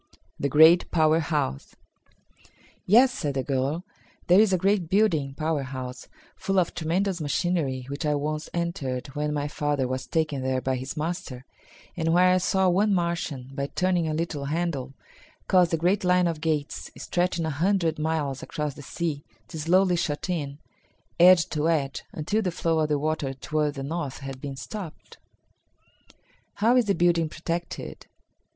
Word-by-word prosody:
The 140 Hz, -, 0 dB
Great 160 Hz, +5 st, +6 dB
Power 160 Hz, -1 st, +3 dB
House. 150 Hz, -, -2 dB, 1.1 s
"Yes," 245 Hz, +7 st, +6 dB
said 145 Hz, -4 st, -3 dB
the 135 Hz, -, 0 dB
girl. 140 Hz, +5 st, -1 dB, 0.4 s
"There 180 Hz, +3 st, +6 dB
is 215 Hz, -2 st, +5 dB
a 185 Hz, -, +3 dB
great 190 Hz, -2 st, +1 dB
building 165 Hz, -10 st, +2 dB
(power 155 Hz, 0 st, -1 dB
house) 130 Hz, -1 st, -7 dB, 0.3 s
full 195 Hz, 0 st, -2 dB
of 180 Hz, -2 st, +2 dB
tremendous 175 Hz, +2 st, -1 dB
machinery 145 Hz, -4 st, -1 dB
which 140 Hz, +3 st, -5 dB
I 150 Hz, -1 st, +1 dB
once 150 Hz, +2 st, -3 dB
entered 140 Hz, -7 st, -3 dB
when 150 Hz, +1 st, -2 dB
my 145 Hz, -1 st, -1 dB
father 145 Hz, -3 st, -1 dB
was 130 Hz, +1 st, -4 dB
taken 155 Hz, -4 st, -1 dB
there 130 Hz, 0 st, 0 dB
by 130 Hz, 0 st, -1 dB
his 130 Hz, +5 st, -6 dB
master, 150 Hz, -5 st, -4 dB, 0.5 s
and 165 Hz, -1 st, 0 dB
where 180 Hz, +1 st, +5 dB
I 185 Hz, -, +3 dB
saw 190 Hz, +1 st, +2 dB
one 195 Hz, +3 st, +3 dB
Martian, 165 Hz, -7 st, -2 dB
by 140 Hz, 0 st, -2 dB
turning 180 Hz, 0 st, 0 dB
a 155 Hz, -, -1 dB
little 155 Hz, -3 st, -3 dB
handle, 145 Hz, -4 st, -2 dB, 0.5 s
cause 180 Hz, -2 st, +4 dB
the 165 Hz, -, 0 dB
great 180 Hz, +5 st, +1 dB
line 180 Hz, 0 st, +3 dB
of 165 Hz, -3 st, -2 dB
gates, 155 Hz, -3 st, -2 dB
stretching 175 Hz, -2 st, -1 dB
a 160 Hz, -, -1 dB
hundred 165 Hz, +1 st, +1 dB
miles 150 Hz, -4 st, -1 dB
across 150 Hz, -2 st, -4 dB
the 145 Hz, -, -11 dB
sea, 150 Hz, 0 st, -3 dB, 0.3 s
to 160 Hz, -, -7 dB
slowly 180 Hz, +3 st, +3 dB
shut 165 Hz, +2 st, -2 dB
in, 145 Hz, -5 st, -3 dB, 0.6 s
edge 175 Hz, -1 st, +7 dB
to 155 Hz, +1 st, 0 dB
edge, 140 Hz, -4 st, -1 dB
until 205 Hz, +8 st, -1 dB
the 190 Hz, -, 0 dB
flow 165 Hz, -1 st, 0 dB
of 155 Hz, -1 st, +1 dB
the 150 Hz, -, +2 dB
water 145 Hz, -2 st, -2 dB
toward 150 Hz, +2 st, -1 dB
the 135 Hz, -, -5 dB
north 145 Hz, -2 st, -4 dB
had 135 Hz, -1 st, -7 dB
been 140 Hz, -2 st, -5 dB
stopped." 185 Hz, +3 st, -8 dB, 1.4 s
"How 225 Hz, +4 st, +3 dB
is 250 Hz, -2 st, +4 dB
the 200 Hz, -, +1 dB
building 170 Hz, -2 st, +2 dB
protected?" 170 Hz, +2 st, -5 dB
160 Hz, 170 wpm, -26 LUFS, 140-175 Hz, 1.4 s, edge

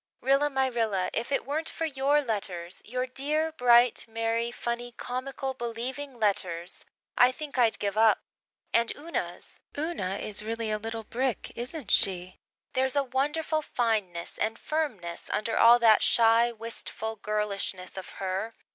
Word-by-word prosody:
Rilla 275 Hz, +2 st, +3 dB
my 265 Hz, -1 st, +1 dB
Rilla, 220 Hz, -7 st, 0 dB
if 235 Hz, +4 st, -2 dB
it 275 Hz, -, 0 dB
weren't 305 Hz, +3 st, -1 dB
for 330 Hz, -, -3 dB
your 285 Hz, 0 st, +2 dB
letters 190 Hz, -7 st, -4 dB
your 250 Hz, +3 st, -2 dB
dear, 300 Hz, +5 st, -1 dB
bright, 245 Hz, -4 st, +5 dB
merry, 230 Hz, +1 st, -1 dB
funny, 240 Hz, 0 st, -4 dB
comical, 265 Hz, +1 st, -4 dB
believing 250 Hz, +3 st, -5 dB
letters 180 Hz, -5 st, -1 dB, 0.4 s
I 250 Hz, +1 st, +7 dB
think 285 Hz, 0 st, -6 dB
I'd 230 Hz, -2 st, +4 dB
give 200 Hz, -1 st, -2 dB
up. 220 Hz, -1 st, +5 dB, 0.5 s
And 230 Hz, 0 st, +3 dB
Una's! 325 Hz, +4 st, -5 dB, 0.2 s
Una 290 Hz, -, -2 dB
is 210 Hz, +1 st, -1 dB
really 225 Hz, 0 st, -2 dB
a 215 Hz, -, 0 dB
little 225 Hz, +1 st, -5 dB
brick, 250 Hz, +3 st, -2 dB
isn't 245 Hz, -, -5 dB
she? 185 Hz, -1 st, +3 dB, 0.3 s
There's 260 Hz, +1 st, +1 dB
a 280 Hz, -, +3 dB
wonderful 295 Hz, +4 st, 0 dB
fineness 215 Hz, -, -1 dB
and 225 Hz, +1 st, 0 dB
firmness 230 Hz, -, -3 dB
under 220 Hz, +2 st, -1 dB
all 235 Hz, +1 st, +8 dB
that 225 Hz, -3 st, +6 dB
shy, 230 Hz, +1 st, +5 dB
wistful 225 Hz, -1 st, -5 dB
girlishness 200 Hz, -3 st, -2 dB
of 190 Hz, -1 st, -7 dB
her. 195 Hz, +4 st, -3 dB
235 Hz, 145 wpm, -28 LUFS, 215-265 Hz, 0.5 s, all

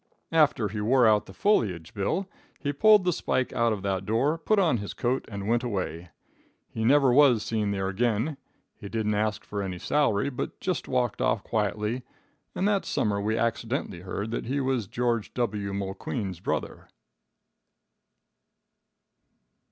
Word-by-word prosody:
"After 150 Hz, -8 st, +3 dB
he 105 Hz, +1 st, -4 dB
wore 125 Hz, +3 st, +4 dB
out 105 Hz, -2 st, +3 dB
the -, -, -10 dB
foliage, 95 Hz, -, +1 dB
Bill, 140 Hz, -, -1 dB, 0.3 s
he 145 Hz, -2 st, -2 dB
pulled 210 Hz, +7 st, +6 dB
the 180 Hz, -1 st, +2 dB
spike 130 Hz, -4 st, -1 dB
out 115 Hz, -1 st, +2 dB
of 100 Hz, -3 st, -3 dB
that 95 Hz, -1 st, -1 dB
door, 115 Hz, +10 st, +1 dB
put 215 Hz, +6 st, +1 dB
on 170 Hz, -10 st, +3 dB
his 100 Hz, -1 st, -6 dB
coat 125 Hz, +2 st, -1 dB
and 100 Hz, -2 st, -6 dB
went 120 Hz, +1 st, +2 dB
away. 95 Hz, -7 st, -3 dB, 0.6 s
He 110 Hz, -, -3 dB
never 135 Hz, +1 st, +5 dB
was 130 Hz, -5 st, +5 dB
seen 110 Hz, -2 st, -1 dB
there 95 Hz, -1 st, -1 dB
again. 115 Hz, +7 st, 0 dB, 0.4 s
He 100 Hz, -, -8 dB
didn't 105 Hz, -1 st, -1 dB
ask 105 Hz, 0 st, -1 dB
for 100 Hz, -1 st, -4 dB
any 95 Hz, -2 st, -4 dB
salary, 140 Hz, +1 st, +1 dB
but 125 Hz, -, -5 dB
just 185 Hz, -2 st, -2 dB
walked 125 Hz, -3 st, 0 dB
off 105 Hz, -, +1 dB
quietly, 105 Hz, +2 st, -1 dB, 0.5 s
and 195 Hz, -, +1 dB
that 205 Hz, -2 st, +2 dB
summer 100 Hz, -2 st, 0 dB
we 110 Hz, +2 st, 0 dB
accidently 115 Hz, -, -2 dB
heard 100 Hz, +4 st, -4 dB
that 115 Hz, -, -3 dB
he 140 Hz, +3 st, 0 dB
was 130 Hz, -6 st, 0 dB
George 120 Hz, 0 st, -1 dB
W. 105 Hz, -5 st, -1 dB
Mulqueen's 100 Hz, 0 st, -4 dB
brother." -, -, -3 dB
110 Hz, 160 wpm, -27 LUFS, 100-130 Hz, 0.6 s, pulled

